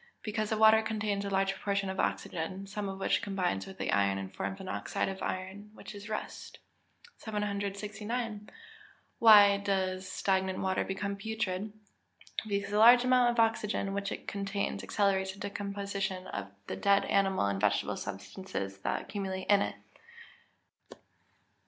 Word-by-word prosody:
_ - - -29 0.2
Because 215 -1 -2
the 220 - 0
water 220 0 +7
contains 215 -2 -2
a - - -2
large 195 0 +1
proportion 200 0 -1
of 190 0 -4
oxygen, 185 +4 -2
some 200 0 -4
of 195 - -5
which - - +1
combines 185 - -1
with 95 - -10
the - - -2
iron 100 -1 +2
and 95 0 -6
forms 195 - -4
an 190 - -8
oxide - - -2
of 195 0 -5
iron, 190 +3 -4
which - - -10
is 205 +1 -9
rust. 215 - -6 0.6
769. 210 +1 -3 0.7
Why 205 -3 +8
does 190 -2 -1
stagnant 190 -1 0
water 190 0 0
become 200 +1 -3
putrid? 210 -1 -3 0.8
Because 200 -1 -2
the 210 - +2
large 240 +2 +8
amount 250 -1 +4
of 240 -1 -1
oxygen 215 -3 +1
which 200 0 -2
it - - -6
contains 200 0 -2
accelerates 190 -2 +1
the 200 - -15
decomposition 200 -1 -3
of 100 0 -5 0.2
dead 200 - +2
animal 195 - +2
and 100 -1 -1
vegetable 105 -1 +1
substances 100 - -6
that - - -2
accumulate 190 -2 -4
in 200 -1 +6
it. - - -2
200 Hz, 150 wpm, -31 LUFS, 190-210 Hz, 0.8 s, Why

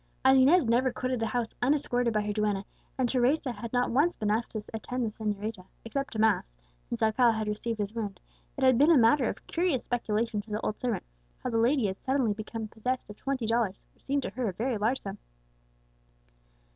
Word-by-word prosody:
As 265 0 +7
Inez 280 +5 +6
never 245 +3 +3
quitted 255 0 -2
the 225 - 0
house 240 -2 -2
unescorted 245 -3 +1
by 215 -1 +1
her 210 0 -2
duenna, 205 -2 0 0.3
and 260 -2 +2
Teresa 260 +3 +2
had 230 0 -7
not 245 0 +1
once 290 +8 +3
been 210 -2 -1
asked 225 +2 -1
to 215 - -3
attend 245 +2 -3
the 220 - -2
señorita 210 -2 -4 0.2
except 275 +5 -3
to - - -5
mass 215 - +2 0.4
since - - -2
Alcala 230 +2 +4
had 220 -1 -2
received 215 +2 -2
his 205 0 -3
wound, 205 -5 -4 0.4
it 270 - -2
had 260 -2 +5
been 295 +3 +6
a 330 - +7
matter 240 +2 +4
of - - -7
curious 335 -7 0
speculation 225 -2 -1
to 215 - -19
the 210 +1 -2
old 215 - -3
servant 240 -4 -1 0.4
how 250 - -2
the 230 - +1
lady 245 +1 +3
had 190 -1 -3
suddenly 260 -5 +1
become 215 +1 -5
possessed 230 +2 -3
of - - -10
twenty 270 -4 -2
dollars, 225 -4 0
which - - -32
seemed 280 0 0
to - - -4
her 250 -4 -2
a - - -5
very 240 +6 -1
large 230 +6 +1
sum. 195 0 -6
230 Hz, 215 wpm, -29 LUFS, 215-255 Hz, 0.4 s, As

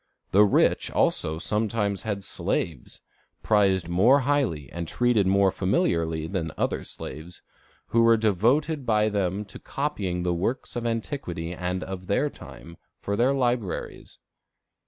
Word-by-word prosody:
The 100 +2 +6
rich 100 - +2
also 80 +1 +1
sometimes 105 +1 -1
had 100 -3 -3
slaves, 80 -5 -3 0.4
prized 95 -5 +2
more 110 +11 +4
highly 130 - 0
and 85 -1 -5
treated 120 -3 +2
more 100 0 +4
familiarly 85 -4 0
than 80 -2 -3
other - - -1
slaves, 85 +3 -9 0.5
who 115 - +3
were 115 0 +5
devoted 120 - +1
by 110 -2 +2
them 100 0 -1
to 100 - -12
copying 100 -12 -3
the 90 -1 0
works 105 +10 -2
of 120 -1 -2
antiquity 110 - -4
and 90 +1 -3
of 95 -1 -7
their 140 +8 +1
time, 85 +1 -12 0.2
for 100 - -2
their 120 +5 +3
libraries. 120 -6 -2
100 Hz, 135 wpm, -26 LUFS, 90-115 Hz, 0.5 s, The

